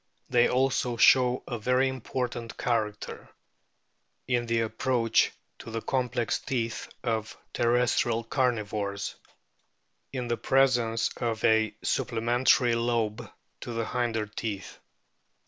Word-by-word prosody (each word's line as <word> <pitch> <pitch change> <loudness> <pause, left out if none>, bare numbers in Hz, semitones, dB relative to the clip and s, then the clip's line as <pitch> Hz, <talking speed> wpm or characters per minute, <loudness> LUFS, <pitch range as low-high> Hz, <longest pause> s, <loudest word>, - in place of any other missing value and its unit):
They 120 0 +4
also 130 -2 +1
show 125 +1 +5
a 120 -3 -4
very 125 +4 +2
important 125 -2 -4
character 110 -3 -2 1.0
(in 120 -1 0
the 115 0 +1
approach 115 +1 +1 0.3
to - - -9
the 115 0 -3
complex 125 -2 0
teeth 115 -3 -3
of 110 -2 -2 0.2
terrestrial 120 -1 +2
carnivores) 105 -5 -1 1.0
in 125 -3 -3
the 120 0 -1
presence 125 -4 +2
of 115 -2 -2
a 110 -1 +3
supple 115 - -1
mentary 120 +1 +3
lobe 115 -2 -1 0.3
to 120 - -6
the 115 0 -1
hinder 115 -2 -1
teeth. 105 -2 -6
120 Hz, 110 wpm, -28 LUFS, 110-125 Hz, 1.0 s, show